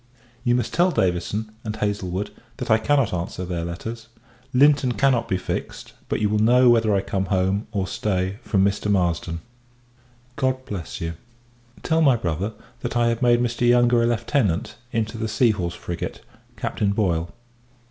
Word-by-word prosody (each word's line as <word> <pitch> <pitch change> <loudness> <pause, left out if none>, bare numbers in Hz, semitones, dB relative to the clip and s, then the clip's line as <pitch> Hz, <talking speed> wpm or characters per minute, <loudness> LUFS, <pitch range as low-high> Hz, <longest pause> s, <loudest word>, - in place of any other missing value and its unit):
You 120 -2 +3
must 125 - -1
tell 175 +2 +4
Davison, 100 - -1
and 110 -1 -4
Haslewood, 100 -2 -2 0.3
that - - -3
I 110 - +5
cannot 135 -1 +2
answer 90 +1 -3
their 85 -2 -3
letters. 110 +7 -6 0.4
Linton 135 -1 +4
cannot 130 -2 +2
be 95 - 0
fixed; 90 - -5 0.2
but - - 0
you 105 - +2
will 105 +1 +1
know 125 +3 +6
whether 115 -2 +3
I 95 - +2
come 95 0 -2
home, 95 +2 0
or 100 -4 -1
stay, 95 +1 -2
from 95 -3 +2
Mr. 100 +1 0
Marsden. 85 -3 0 1.0
God 130 0 0
bless 90 -6 -6
you! 85 0 -2 0.7
Tell 160 0 +2
my 140 -5 +5
brother, 95 0 -2 0.3
that 120 - -3
I 120 0 +3
have 115 +1 -1
made 120 -1 +4
Mr. 120 0 0
Yonge 120 0 +4
a 115 -1 +4
Lieutenant, 115 - 0 0.2
into 115 -1 -2
the 110 - -1
Sea 110 +2 +3
horse 90 -4 -3
frigate, 85 -1 -5 0.4
Captain 100 -1 -1
Boyle. 85 -6 0
110 Hz, 170 wpm, -23 LUFS, 95-120 Hz, 1.0 s, know